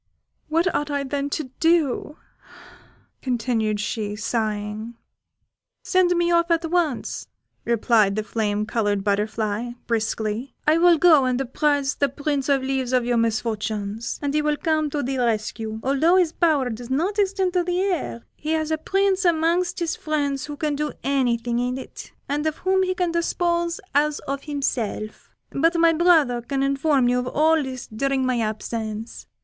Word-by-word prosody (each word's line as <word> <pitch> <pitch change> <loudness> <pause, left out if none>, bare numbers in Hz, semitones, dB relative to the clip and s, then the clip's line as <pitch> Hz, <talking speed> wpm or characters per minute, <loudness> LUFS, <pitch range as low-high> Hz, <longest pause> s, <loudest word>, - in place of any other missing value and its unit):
What 335 +3 +1
ought 295 0 -1
I, 285 -1 -1
then, 280 +1 -2
to 285 -3 -4
do?" 315 -3 +1 1.0
continued 225 -4 0
she, 210 0 -3
sighing. 215 0 -3 0.9
"Send 360 -2 +3
me 345 0 +2
off 340 0 +3
at 335 0 +2
once," 335 -8 -1 0.4
replied 225 -3 +3
the 215 - -1
flame 210 -1 -1
coloured 205 -3 0
butterfly, 215 +3 -1
briskly; 225 +2 -2
"I 310 +2 +4
will 345 -1 +6
go 310 -5 +6
and 255 0 0
apprise 280 +1 +1
the 280 - 0
Prince 285 0 -2
of 275 -2 +2
Leaves 265 -1 -1
of 250 -2 +2
your 240 -1 +1
misfortunes, 220 -1 -2
and 285 0 -1
he 300 - +2
will 300 0 0
come 310 -3 0
to 290 0 -2
the 265 +1 -2
rescue: 220 -1 -1
although 280 +7 +3
his 360 -4 +3
power 300 -8 +1
does 235 +2 -7
not 350 +10 0
extend 385 -2 +1
to 360 -1 +2
the 355 +1 0
air, 355 -11 -2
he 310 +1 -3
has 315 -1 -1
a 315 - 0
prince 390 +3 +1
amongst 345 +1 +2
his 340 -2 -1
friends 285 -3 -2
who 295 -1 -6
can 300 0 -1
do 300 +1 -2
anything 240 -3 0
in 250 +1 -1
it, 265 - -9 0.2
and 295 +2 -1
of 310 - -2
whom 380 0 +3
he 370 0 0
can 355 -2 0
dispose 340 0 0
as 295 +1 +2
of 275 0 -5
himself 245 -7 -3 0.2
but 330 +5 +2
my 335 0 +5
brother 315 -8 +3
can 270 +3 -2
inform 275 -1 +2
you 250 0 +2
of 250 - -3
all 315 +4 +3
this 260 -3 -5
during 265 +4 -1
my 255 -2 +1
absence. 220 0 -4
275 Hz, 165 wpm, -23 LUFS, 235-320 Hz, 1.0 s, will